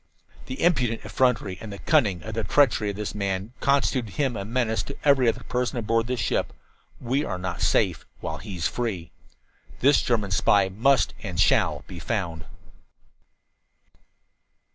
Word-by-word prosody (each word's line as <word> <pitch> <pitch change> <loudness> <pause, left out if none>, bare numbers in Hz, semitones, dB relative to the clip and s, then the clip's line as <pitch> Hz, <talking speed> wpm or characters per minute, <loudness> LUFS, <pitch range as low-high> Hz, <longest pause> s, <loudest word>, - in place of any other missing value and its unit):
"The 130 - -4
impudent 125 -10 +1
effrontery 110 -8 0
and 110 - -7
the 100 - -7
cunning 105 - +2
treachery 110 +1 +1
of 100 - -4
this 105 +1 -4
man 100 +2 -3
constitute 130 -5 +1
him 135 -5 0
a 100 - -3
menace 115 +1 0
to 140 - -8
every 135 -4 +5
other - - -3
person 125 +1 -2
aboard 115 0 0
this 125 -1 -2
ship. 100 - -1 0.5
We 130 +4 0
are - - -3
not 90 -4 -4
safe - - +2 0.2
while - - -5
he 100 - -8
is 85 -4 0
free. 95 -9 -3 0.7
"This 140 +2 +4
German 105 -5 0
spy 95 0 +3
must 125 +8 +2
and - - -5
shall - - +3
be - - -9
found." 80 -2 -3
115 Hz, 150 wpm, -25 LUFS, 100-130 Hz, 0.7 s, every